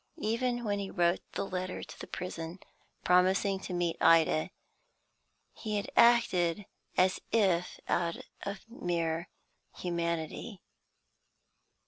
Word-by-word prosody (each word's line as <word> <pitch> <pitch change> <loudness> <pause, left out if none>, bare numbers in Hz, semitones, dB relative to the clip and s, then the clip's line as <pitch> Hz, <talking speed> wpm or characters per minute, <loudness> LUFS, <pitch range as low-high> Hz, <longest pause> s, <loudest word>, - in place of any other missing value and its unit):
Even 240 -1 0
when 205 -2 0
he 195 -1 -4
wrote 175 -1 +2
the - - -2
letter 185 -1 -4
to - - -11
the - - -7
prison, 170 -1 -5 0.5
promising 190 +2 +3
to 190 - -7
meet 175 -2 0
Ida, 160 -1 +5 1.0
he 215 -2 -4
had 200 - -3
acted 205 -6 +4 0.3
as 185 0 +4
if 185 -6 +2
out 170 -1 0 0.2
of 200 +2 -6
mere 170 -5 -2 0.5
humanity. 170 +3 -3
185 Hz, 110 wpm, -31 LUFS, 170-205 Hz, 1.0 s, Ida